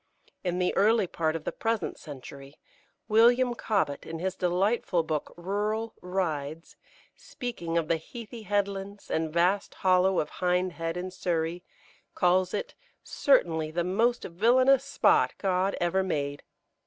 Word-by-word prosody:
In 180 -1 -1
the 180 0 0
early 215 +1 +4
part 160 -2 -1
of 165 - -4
the - - -2
present 225 -1 -2
century, 140 -1 -10 0.5
William 240 +3 +5
Cobbett, 200 -11 -1
in 165 - -6
his 185 +3 -2
delightful 180 0 +1
book, 155 -2 -3
"Rural 210 +5 -2
Rides," 165 -4 -3 0.4
speaking 220 - -5
of 165 -2 0
the 165 - +2
heathy 230 +7 -9
headlands 200 -1 -3
and 160 -1 0
vast 180 +5 +1
hollow 185 0 +3
of 150 - -2
Hindhead, 180 -2 0
in 185 +1 -4
Surrey, 175 -1 -2 0.5
calls 180 +1 +3
it - - -4 0.3
"certainly 165 - +2
the 170 +2 -1
most 225 +7 +1
villainous 250 +9 +4
spot 280 - +3
God 190 0 0
ever 175 +2 +1
made." 145 -6 -2
185 Hz, 135 wpm, -28 LUFS, 165-210 Hz, 0.5 s, William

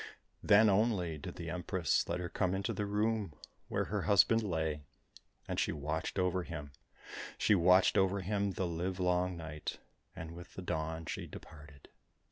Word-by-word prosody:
Then 105 +2 +6
only 95 -6 +2
did - - -7
the - - -5
Empress 90 -1 0
let 85 +1 -1
her 90 - -3
come 90 +1 0
into 95 0 -2
the 105 - -2
room 105 -3 0 0.3
where - - 0
her - - -2
husband 110 +3 +5
lay. 80 -7 -1 0.7
And - - -2
she - - +1
watched 75 +5 -3
over 90 0 +1
him, 75 -5 -7 0.7
she - - +3
watched 90 0 +5
over 95 +1 +2
him 100 +1 -1
the 95 - -1
live 90 +2 -3
long 90 0 +1
night, 80 -2 -5 0.4
and 80 0 -7
with 85 +1 -11
the 95 - -6
dawn 80 -1 -3
she - - -4
departed. 75 -2 -12
90 Hz, 165 wpm, -33 LUFS, 80-100 Hz, 0.7 s, Then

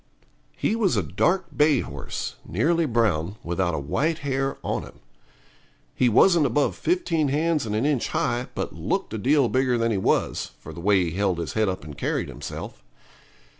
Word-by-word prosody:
He 220 - 0
was 215 -5 +2
a - - +2
dark 185 +1 0
bay 150 -3 +4
horse, 70 -1 -5
nearly 165 - +1
brown, 105 - +1
without 85 0 -1
a - - -2
white 150 - 0
hair 135 0 -1
on - - -1
him. - - -12 1.0
He 125 - +3
wasn't 165 - +5
above 140 +4 +1
15 180 - 0
hands 150 -1 +1
and 105 - -2
an 110 +5 +1
inch 145 -5 +1
high, 120 +1 -1
but - - -3
looked - - -2
a 110 - -3
deal 140 +3 +3
bigger 130 0 +1
than 115 0 +1
he 100 - 0
was, - - 0
for - - -10
the 85 - -8
way 95 0 +3
he 85 - -2
held 95 0 0
his 85 -2 -4
head 110 -2 +2
up 95 - -4
and 75 -1 -9
carried - - -2
himself. - - -7
120 Hz, 185 wpm, -25 LUFS, 95-150 Hz, 1.0 s, wasn't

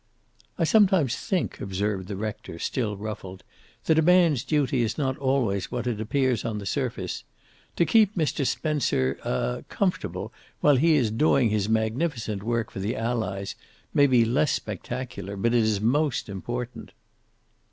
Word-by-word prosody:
"I 170 - +1
sometimes 185 - +4
think," 185 -3 -2
observed 100 -1 -2
the 100 - -4
rector, 105 -4 -5
still 105 +2 -2
ruffled, 95 -3 -7 0.4
"that 160 0 +4
a - - +5
man's 165 -6 +4
duty 140 -5 +1
is 115 -1 -1
not 135 -3 0
always 130 -8 0
what 125 -1 -3
it 115 -3 -2
appears 125 +1 +1
on 110 -2 -2
the 100 - -6
surface. - - -3 0.5
To 170 - +3
keep 215 0 +4
Mr. 155 -4 0
Spencer 135 - 0
er 60 -1 -2
comfortable, - - -2 0.3
while 145 -2 +5
he 160 +4 +4
is 120 -7 +2
doing 120 -1 +3
his 105 -1 0
magnificent 110 -1 -1
work 115 +1 -1
for - - -6
the 105 +6 -2
Allies, 110 -4 -2 0.4
may 145 -1 +5
be 125 -3 +4
less 130 +6 +2
spectacular, 120 -6 -5
but 115 +4 +1
it 120 - +4
is 110 -2 +1
most 135 +3 +1
important." 120 +1 -5
120 Hz, 155 wpm, -26 LUFS, 105-145 Hz, 0.5 s, a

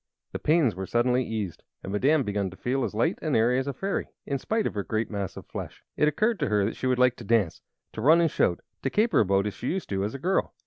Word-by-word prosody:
The - - -4
pains 155 -7 +3
were 95 +1 -5
suddenly 125 +2 +2
eased, 110 -7 -4 0.2
and 95 - -5
Madame 135 +8 +3
began 100 -3 -1
to 95 - -13
feel 130 +2 -1
as - - -3
light 160 - +1
and 155 -4 0
airy 120 +3 +3
as 135 - -3
a 140 - -2
fairy, 195 +9 -2 0.2
in 140 -2 -2
spite 220 - -1
of - - -1
her 100 - -2
great 110 +2 -2
mass 100 -3 -4
of - - -8
flesh. - - -8
It 150 - +3
occurred 215 +9 +1
to - - 0
her 105 -2 +2
that 110 - -2
she 130 - -2
would 130 -1 +2
like 125 -1 +4
to - - -9
dance; 110 -8 +1 0.3
to 110 - -5
run 155 +7 +6
and 165 -3 +2
shout, 85 - +1 0.2
to 135 - 0
caper 215 - +2
about 100 -1 +3
as 105 - -2
she 125 - -6
used 190 +1 -3
to 100 - -2
do 95 - 0
as 105 +6 -3
a - - -3
girl. 180 +8 0
125 Hz, 280 wpm, -27 LUFS, 105-150 Hz, 0.3 s, run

